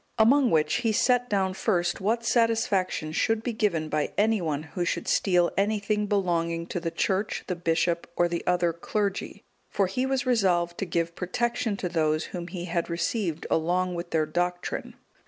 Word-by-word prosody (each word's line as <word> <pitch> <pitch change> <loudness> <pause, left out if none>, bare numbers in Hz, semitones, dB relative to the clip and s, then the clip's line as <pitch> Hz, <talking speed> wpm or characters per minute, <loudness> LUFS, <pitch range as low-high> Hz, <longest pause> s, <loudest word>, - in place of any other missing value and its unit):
Among 250 +4 +5
which, 155 -1 +2
he 230 -2 +1
set 245 +3 +2
down 190 -2 +1
first 185 -3 0
what 230 +4 0
satisfaction 220 -9 +1
should 225 +7 +1
be 240 - -2
given 185 -8 0
by 155 -1 -1
any 215 0 +3
one 155 -3 -2
who 165 +3 -4
should 170 - -2
steal 180 -3 +3
anything 210 +1 0
belonging 170 -4 0
to 175 - -2
the 170 -1 -2
Church, 195 +4 -1
the 180 - -2
bishop, 170 0 0
or 175 - +3
the 170 0 -3
other 175 -1 +2
clergy, 200 +4 -3 0.3
for 200 - +1
he 250 +8 -1
was 265 -1 0
resolved 180 -8 +1
to - - -1
give 170 -1 -1
protection 230 +3 -1
to 185 - -2
those 155 -2 +1
whom 175 -2 -4
he 175 -1 -6
had 170 -1 -2
received 170 -1 -2
along 180 +3 +1
with 170 0 -5
their 160 -2 +1
doctrine. 175 +3 -3
180 Hz, 175 wpm, -27 LUFS, 170-215 Hz, 0.3 s, Among